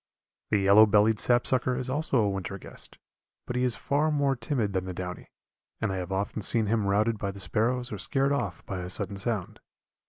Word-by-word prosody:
The 105 - +2
yellow 100 +2 +6
bellied 105 +1 +3
sapsucker 125 +1 +2
is 130 0 -4
also 140 +1 0
a 105 -3 +2
winter 95 0 -5
guest, - - -9 0.5
but 125 - -5
he 125 - 0
is 125 -2 0
far 145 +3 0
more 140 -2 +1
timid 115 -4 -2
than 95 -1 -1
the 90 -1 -6
downy, 90 0 -6 0.5
and - - -1
I 95 - -3
have 90 +1 -5
often 100 +3 -2
seen 110 +2 +6
him 105 -1 0
routed 105 +2 +1
by 100 - -2
the 100 0 -8
sparrows 120 +5 -1
or 105 - -5
scared 135 +5 +1
off 100 - -3
by 95 - -5
a 90 0 -6
sudden 100 +1 -1
sound. 100 -2 -3
110 Hz, 210 wpm, -27 LUFS, 100-125 Hz, 0.5 s, yellow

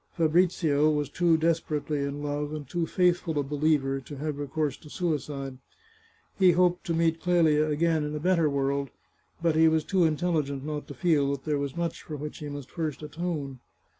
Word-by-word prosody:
Fabrizio 160 -3 +3
was 150 -1 -1
too 170 -2 +3
desperately 155 -2 0
in 140 +1 -3
love, 145 0 -2
and 145 -3 -7
too 170 +3 -2
faithful 175 -3 +1
a 145 - +2
believer, 140 -1 +1
to 135 +2 -10
have 150 0 -3
recourse 145 0 -1
to 150 - -15
suicide. 145 -6 -3 0.8
He 185 -2 +6
hoped 180 +1 +2
to 165 - 0
meet 165 0 +1
Clelia 160 -4 +3
again 160 +1 +1
in 150 0 -3
a - - -2
better 170 -2 +2
world, 140 0 -1 0.5
but 165 -2 +2
he 160 0 +6
was 160 -1 +2
too 185 -1 +2
intelligent 155 -4 0
not 150 -1 -4
to - - -8
feel 155 -6 +2
that 140 -1 -3
there 150 -2 0
was 140 +1 -4
much 170 -1 -2
for 155 - -7
which 150 +1 -6
he 150 - -6
must 145 -2 -8
first 155 -3 -4
atone. 150 -4 -4
150 Hz, 190 wpm, -27 LUFS, 145-165 Hz, 0.8 s, He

